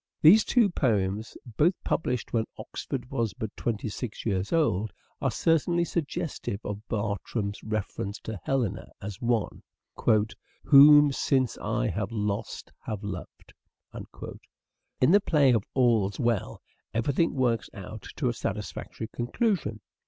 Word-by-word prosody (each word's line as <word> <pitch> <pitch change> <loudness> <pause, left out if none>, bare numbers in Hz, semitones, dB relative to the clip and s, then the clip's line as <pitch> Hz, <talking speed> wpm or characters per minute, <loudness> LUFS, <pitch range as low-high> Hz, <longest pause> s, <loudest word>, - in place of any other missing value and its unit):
These 190 +7 +8
two 240 -4 +4
poems, 110 - 0
both 150 - +2
published 125 -7 -1
when 115 -1 +2
Oxford 125 -2 -6
was 115 -5 -1
but 110 -2 -5
twenty 115 -2 -2
six 110 +1 -6
years 95 -3 -1
old, 110 - +1 0.3
are - - +2
certainly 170 +1 +2
suggestive 155 - -3
of 105 0 -4
Bertram's 100 -1 -2
reference 110 -1 -3
to 110 -3 -6
Helena 120 -7 -1
as 100 -1 -7
one 115 -4 0 0.5
" 110 0 -2
whom 145 0 +8
since 130 -2 +1
I - - -1
have 105 0 -3
lost 105 -2 -3 0.2
have 105 -1 -4
loved." 95 -4 -8 1.5
In 130 - +5
the 205 +2 +6
play 145 -8 +4
of 110 -4 +2
"All's 115 -6 +2
Well," 115 - -1 0.3
everything 140 +9 +1
works 120 -4 +1
out 100 +1 -8
to - - -1
a - - +1
satisfactory 110 - -5
conclusion. 120 - -1
115 Hz, 130 wpm, -27 LUFS, 105-140 Hz, 1.5 s, These